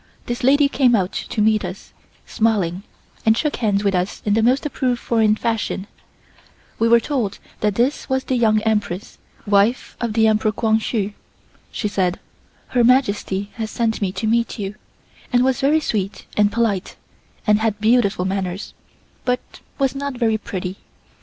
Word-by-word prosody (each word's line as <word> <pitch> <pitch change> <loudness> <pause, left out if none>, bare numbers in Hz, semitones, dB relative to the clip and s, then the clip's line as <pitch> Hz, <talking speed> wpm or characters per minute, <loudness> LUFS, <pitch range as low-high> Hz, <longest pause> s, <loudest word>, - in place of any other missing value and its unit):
This 240 +2 -4
lady 280 +3 +5
came 255 -3 +3
out 190 -3 0
to 215 - -2
meet 215 -1 +3
us, 185 +1 -7 0.3
smiling, 200 -6 0 0.4
and 220 0 +4
shook 300 +2 0
hands 205 -3 +1
with 200 -1 +2
us 180 +2 -2
in 205 - +2
the 225 - +3
most 255 +6 +2
approved 255 -4 -1
foreign 220 -3 +2
fashion. 225 -4 -2 0.9
We 230 - +3
were 235 0 +6
told 235 -6 -1
later - - -13 0.2
that 210 -2 0
this 255 +7 0
was 265 0 +1
the 260 - -1
Young 215 -3 +3
Empress, 210 -3 -2 0.3
wife 205 +4 +2
of 235 -3 -1
the 220 0 +3
Emperor 215 0 +2
Kwang 220 +1 +2
Hsu. 210 -2 -2 0.6
She 215 - -2
said: 185 -3 0 0.5
"Her 245 -2 +2
Majesty 205 -5 +2
has 220 -1 -3
sent 225 -2 -1
me 195 -2 0
to 220 - -3
meet 230 +1 +1
you," 200 -2 -4 0.6
and 245 -1 +4
was 265 +1 +1
very 290 +4 +4
sweet 205 -9 -3
and 210 0 +3
polite, 215 -5 -1 0.5
and 210 -1 +4
had 220 -2 0
beautiful 215 -4 +2
manners; 190 0 -3 0.5
but 250 0 -3 0.2
was 270 -2 +1
not 280 -1 -4
very 225 -3 +1
pretty. 185 -2 -5
220 Hz, 170 wpm, -21 LUFS, 200-245 Hz, 0.9 s, were